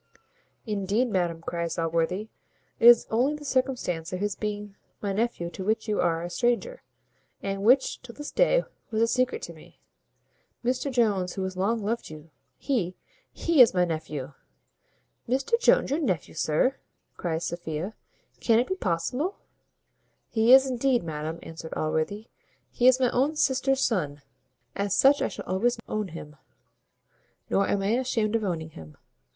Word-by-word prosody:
"Indeed, 210 +3 0
madam," 175 -3 0
cries 170 -1 -3
Allworthy, 170 +5 -1 0.5
"it 230 - +6
is 240 -1 +8
only 255 +7 +2
the 295 0 -10
circumstance 255 - -1
of 185 - -3
his 205 0 -1
being 210 -1 -5 0.2
my 200 -2 -2
nephew 205 -5 -1
to 190 - -6
which 220 +3 0
you 210 -1 +1
are 165 0 +1
a 175 - -4
stranger, 245 - 0 0.6
and 195 0 -3
which, 255 +6 +3
till 245 -2 -12
this 295 0 -7
day, - - +3 0.3
was 220 -2 -2
a - - +3
secret 255 - 0
to - - -6
me. - - -17 0.9
Mr 255 +3 0
Jones, 205 -7 +1
who 190 - -3
has 190 0 -4
long 210 +4 0
loved 230 +3 -2
you, 155 +1 -12 0.3
he! 195 -10 -1 0.4
he 335 -5 +3
is 230 -6 +7
my 180 0 +4
nephew!" 155 -4 -5 1.0
"Mr 270 - +1
Jones 480 - +3
your 290 - +1
nephew, 185 - -1
sir!" 160 - +1 0.4
cries 165 -1 -2
Sophia, 170 +3 -4 0.5
"can 225 -2 +3
it 240 - +3
be 375 - -2
possible?" 250 - -2 0.9
"He 225 +1 +3
is, 265 +1 +9
indeed, 255 -2 +1
madam," 160 0 -4
answered 165 0 -8
Allworthy; 160 +7 -1 0.5
"he 245 - +2
is 255 0 +6
my 255 -2 +2
own 280 +5 +1
sister's 270 -2 +1
son 150 - -1 0.5
as 200 -1 0
such 280 +2 +5
I - - +2
shall - - -8
always 235 +6 +1
own 215 -1 -2
him; 155 -3 -10 1.1
nor 200 - +2
am 200 -1 0
I 195 - 0
ashamed 230 -4 0
of 225 - 0
owning 160 -5 -3
him. 80 - -12
210 Hz, 160 wpm, -27 LUFS, 170-250 Hz, 1.1 s, is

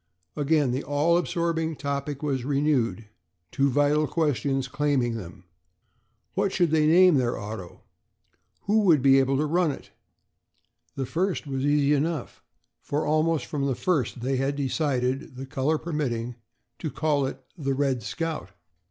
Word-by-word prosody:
Again 145 -2 +2
the 130 +3 -1
all 145 +4 +2
absorbing 170 -2 0
topic 140 0 -4
was 135 -4 -1
renewed, 135 -5 0 0.5
two 140 +1 +2
vital 145 +3 +2
questions 140 -4 0
claiming 135 -4 0
them. 90 -4 -9 0.9
What 195 0 0
should 175 -5 +1
they 155 -1 +3
name 175 0 +6
their 125 -2 0
auto? 105 -4 -8 0.8
Who 210 +2 +3
would 170 -10 +4
be 135 0 +6
able 135 0 +2
to 150 - +1
run 170 +2 +2
it? 140 - -7 1.0
The 135 - -2
first 175 +7 -1
was 135 -2 -3
easy 145 0 +3
enough, 150 -1 -2 0.4
for 145 +2 -2
almost 155 +1 +1
from 140 -2 -2
the 135 - 0
first 130 -7 -1
they 130 +2 0
had 135 +2 0
decided, 135 -1 -1
the 130 +1 -6
color 140 +3 0
permitting, 130 -8 -3 0.5
to 155 - -3
call 145 -3 0
it 135 - -6 0.2
the 135 -5 -2
"Red 135 -3 0
Scout." 160 - -4
145 Hz, 150 wpm, -26 LUFS, 130-155 Hz, 1.0 s, name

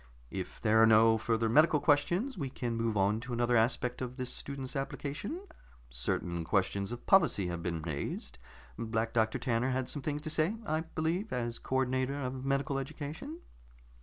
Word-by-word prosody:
"If 95 -2 -5
there 110 0 +4
are 115 - +8
no 110 0 +6
further 115 +1 +1
medical 150 +6 +5
questions, 175 - +2
we 140 -8 -3
can 120 -3 -3
move 115 -2 0
on 100 +3 +2
to 120 +1 -6
another 120 +1 +2
aspect 120 +2 +1
of 125 0 -4
this 125 -1 -3
student's 140 0 -5
application. 145 - -4 0.5
Certain 85 +7 -2
questions 100 +3 0
of 120 - -7
policy 170 - +4
have 85 -1 -4
been 85 -2 -3
raised. 75 -6 -4 0.4
Black 115 0 -1
Doctor 110 -1 +2
Tanner 120 +1 0
had 130 0 -1
some 145 - -4
things 145 +1 -3
to 155 - -2
say, 160 +7 +2
I 155 -3 0
believe, 165 +5 -2
as 120 -1 -2
co 130 - -4
ordinator 130 +1 +1
of 130 -1 -4
medical 140 +1 0
education." 150 +4 -6
125 Hz, 175 wpm, -32 LUFS, 110-145 Hz, 0.5 s, are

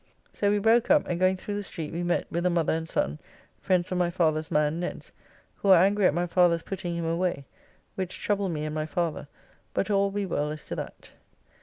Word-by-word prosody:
So 205 - +1
we 205 - +3
broke 225 +3 +3
up, 295 0 +4
and 175 -1 -2
going 185 0 +3
through 205 +2 -6
the - - -2
street 165 -6 -6
we 170 - -2
met 175 0 0
with 170 +1 -1
a - - +3
mother 170 -3 +1
and 160 0 -3
son, 75 +2 -1 0.4
friends 180 -1 +1
of 180 - 0
my 175 -1 +2
father's 160 -3 0
man, 150 0 +1
Ned's, 175 - -5 0.5
who 200 - -1
are 185 -2 +8
angry 200 0 +4
at - - +2
my 175 +1 +1
father's 170 -1 +3
putting 175 -3 -4
him 170 -1 -2
away, 165 -3 -1 0.5
which 185 -1 -4
troubled 200 -3 0
me 155 -2 -3
and 155 - -4
my 155 0 -2
father, 170 -3 -2 0.5
but 205 - 0
all 200 0 +3
will 200 - -2
be 205 0 -2
well 150 -5 -1
as 155 0 -6
to - - -5
that. - - -8
175 Hz, 230 wpm, -27 LUFS, 160-195 Hz, 0.5 s, are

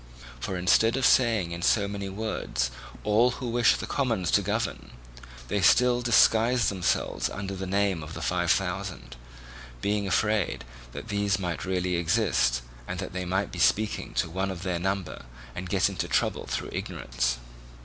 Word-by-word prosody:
For 95 +9 -3
instead 110 +7 +3
of 135 - +1
saying 115 -9 +3
in 85 0 -5
so 100 +2 +3
many 100 -1 -5
words 95 - -2 0.3
"all 110 +4 +4
who 125 - -5
wished 120 0 +3
the - - -4
commons 115 -10 -1
to - - +4
govern," - - -2 0.6
they 100 +8 0
still 125 +6 +4
disguised 120 +1 +4
themselves 95 -3 -1
under 100 -1 -5
the 95 0 -5
name 100 -2 +1
of 75 +1 -8
the - - -6
Five - - 0
Thousand; - - -1 0.6
being 100 +3 -1
afraid 105 - 0 0.3
that 110 - -8
these 100 0 +1
might 90 -3 -3
really 90 -1 0
exist, 85 - +1 0.2
and 90 - -4
that 95 0 -5
they 90 0 -3
might 95 +2 -1
be - - -7
speaking 105 - +1
to - - +1
one 95 +4 -2
of 95 -2 -6
their 90 -2 -1
number 95 -7 -3 0.3
and 90 +4 -6
get 95 -1 +3
into 100 -3 -3
trouble - - 0
through - - -3
ignorance. - - -2
95 Hz, 170 wpm, -27 LUFS, 90-110 Hz, 0.6 s, all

